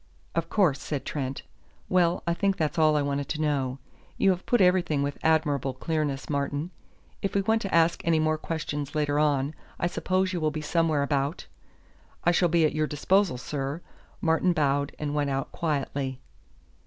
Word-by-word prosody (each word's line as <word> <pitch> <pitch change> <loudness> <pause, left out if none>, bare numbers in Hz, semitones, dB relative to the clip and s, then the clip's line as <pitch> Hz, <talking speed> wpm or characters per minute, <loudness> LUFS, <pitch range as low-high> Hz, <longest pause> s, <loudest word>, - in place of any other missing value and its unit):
"Of - - -1
course," 175 -10 +2
said 140 -4 -4
Trent. 135 -2 -3 0.4
"Well, 180 -1 +2
I 170 - +1
think 195 +2 0
that's 155 +1 -1
all 155 -1 +4
I 145 - +1
wanted 140 -1 -2
to 155 - -2
know. 140 -4 0 0.4
You 195 - +4
have 180 0 -4
put 240 - +3
everything 180 -6 +3
with 140 0 -3
admirable 145 -5 +1
clearness, 145 -1 -2
Martin. 145 +3 -2 0.5
If 195 - -2
we 200 - +3
want 220 +2 +2
to 195 - -1
ask 165 0 +3
any 165 -1 +3
more 155 0 +1
questions 150 -3 -4
later 145 -1 +1
on, 145 -1 +1 0.2
I - - -1
suppose 185 +2 0
you 175 - -2
will 155 - +2
be 155 +1 -4
somewhere 155 -1 +1
about." 140 +2 -1 0.8
"I 175 - +4
shall 175 0 +3
be 165 -1 +4
at 155 - +1
your 155 0 0
disposal, 180 +1 +2
sir." 140 +3 -4 0.4
Martin 165 +2 +2
bowed 140 -2 +1
and 145 -1 -3
went 145 -1 0
out 135 -1 -2
quietly. 140 -4 -2
155 Hz, 180 wpm, -27 LUFS, 140-170 Hz, 0.8 s, all